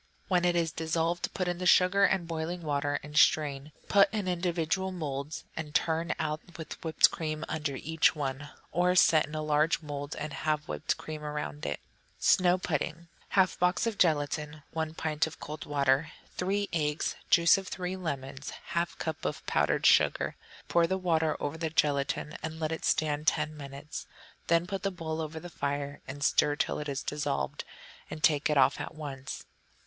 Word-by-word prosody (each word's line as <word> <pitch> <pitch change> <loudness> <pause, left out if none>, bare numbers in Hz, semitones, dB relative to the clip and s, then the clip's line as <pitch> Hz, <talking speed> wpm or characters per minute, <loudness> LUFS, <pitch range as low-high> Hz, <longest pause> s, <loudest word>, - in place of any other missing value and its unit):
When 180 -2 +3
it 175 0 +3
is 165 -2 +1
dissolved, 165 +2 -1
put 185 - -1
in 175 0 -2
the 180 - 0
sugar 190 +3 +6
and 190 -3 +1
boiling 165 +1 -3
water 145 -1 0
and 150 +1 -10
strain; 150 -2 +3 0.2
put 200 0 +5
in 215 0 -1
little 180 - +1
individual 175 +1 -1
moulds, 150 -4 -4
and 150 -2 -6
turn 165 0 +1
out 155 -1 -2 0.2
with 160 - -8
whipped 160 -1 +5
cream 155 -1 -3
under 150 -3 -2
each 160 +3 +2
one. 145 0 -3 0.2
Or, 180 +1 +2
set 160 -4 +5
in 150 - -8
a 155 - -2
large 155 +2 +2
mould, 145 -1 -5
and 150 0 -5
have 150 -1 -1
whipped - - -1
cream 155 -1 -7
around 150 - -4
it. 70 - -2 0.4
Snow 180 -1 +4
Pudding 165 -1 -3 0.2
1/2 190 -2 +3
box 180 +5 +2
of 225 -3 -2
gelatine. 150 -2 +1
1 160 0 -3
pint 155 -1 0
of 160 - -10
cold 150 +1 -7
water. 140 +1 +2 0.3
3 200 +2 0
eggs. 150 -2 0 0.2
Juice 170 +2 +6
of 195 - -9
three 185 0 -3
lemons. 140 -6 -5 0.2
1/2 170 0 -1
cup 160 -2 -4
of 75 - -3
powdered - - +1
sugar. - - +4 0.3
Pour 170 -1 +3
the 190 - 0
water 160 -4 +1
over 145 +2 -3
the 160 -1 -1
gelatine 145 -1 0
and 160 0 -5
let 155 -1 -1
it 160 - -3
stand 150 0 +1
ten 150 +1 +1
minutes; 140 +1 -8 0.4
then 170 +1 +3
put 195 +1 -4
the 195 - 0
bowl 165 -3 -4
over 160 0 -5
the 175 - -8
fire 145 -3 -3
and 140 +1 -6
stir 145 -1 +3
till - - -1
it 150 0 -4
is 140 0 -3
dissolved, 70 - -2 0.5
and 155 - -7
take 150 -1 +4
it 150 - +2
off - - +4
at - - -6
once. 140 -3 -6
155 Hz, 185 wpm, -30 LUFS, 145-170 Hz, 0.5 s, sugar